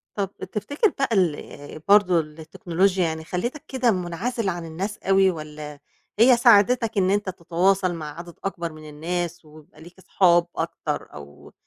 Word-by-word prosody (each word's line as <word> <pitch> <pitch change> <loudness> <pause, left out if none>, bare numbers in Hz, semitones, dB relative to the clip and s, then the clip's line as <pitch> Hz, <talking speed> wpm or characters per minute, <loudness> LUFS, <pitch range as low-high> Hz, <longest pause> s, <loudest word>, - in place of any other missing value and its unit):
طَب 200 -2 -1 0.2
تفتكر 285 - 0
بقى 270 - +1
ال 155 -5 -2
برضه 200 -4 +5
التكنولوجيا 170 +4 -1
يعني 160 -1 -2
خلّتك 235 - -4
كده 255 -3 +1
مُنعزل 195 +5 -2
عن 175 -2 -4
الناس 190 +6 -5
أوي 195 0 +3
والّا 150 -2 -8 0.4
هي 245 +2 +7
ساعدتك 230 0 +4
إن 185 -1 +3
أنت 205 0 0
تتواصل 185 +1 +1
مع 155 -1 -7
عدد 170 0 -9
أكبر 175 -4 -3
من 155 0 -11
الناس 175 +3 -4
ويبقى 155 +1 -17
ليك 175 +2 -13
أصحاب 175 -2 +3
أكتر - - -4
أو 70 0 -13
180 Hz, 150 wpm, -24 LUFS, 160-200 Hz, 0.4 s, هي